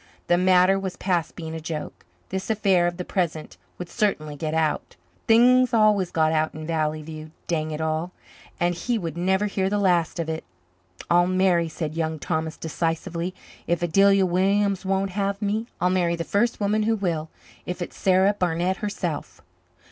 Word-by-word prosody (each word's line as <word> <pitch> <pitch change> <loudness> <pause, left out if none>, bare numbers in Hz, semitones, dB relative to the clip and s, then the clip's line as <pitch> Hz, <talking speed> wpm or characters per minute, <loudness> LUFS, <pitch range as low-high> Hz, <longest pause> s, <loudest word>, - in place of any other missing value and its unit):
The 175 - +3
matter 185 +1 +4
was 190 -2 -5
past 175 -4 -1
being 160 -2 -6
a 160 - -4
joke. 155 -1 -6 0.2
This 190 +2 -4
affair 195 -5 +3
of 175 0 -3
the 180 - -4
present 165 -4 -2 0.2
would 180 - -6
certainly 160 -9 -1
get 155 +2 -3
out 160 -2 -1 0.3
things 250 +2 +5
always 210 -4 +4
got 160 -2 +2
out 155 -1 0
in 155 0 -6
Valley 155 -1 -1
View, 155 0 -8 0.2
dang 155 -2 -1
it 155 0 -4
all 160 +2 -1 0.5
and 175 0 +2
he 235 +7 -1
would 165 -6 -4
never 190 +3 +1
hear 195 -2 0
the 205 - 0
last 180 -5 +2
of 165 -2 -2
it. 160 0 -3 0.7
"I'll 175 +1 +5
marry," 185 -3 +2
said 155 -1 -4
Young 160 -1 -2
Thomas 160 +1 -3
decisively. 165 +2 -3 0.3
"If 175 +1 0
Adelia 195 +3 +4
Williams 195 +2 +1
won't 195 0 0
have 200 +1 -1
me, 215 +2 -1
I'll 180 +1 +2
marry 175 -2 +1
the 165 - -3
first 220 +7 0
woman 210 +1 +1
who 225 +1 +2
will, 170 -6 -2 0.4
if 180 - -4
it's 175 - -6
Sarah 190 +1 +3
Barnett 180 -1 0
herself." 185 -7 -4
180 Hz, 180 wpm, -24 LUFS, 160-195 Hz, 0.7 s, things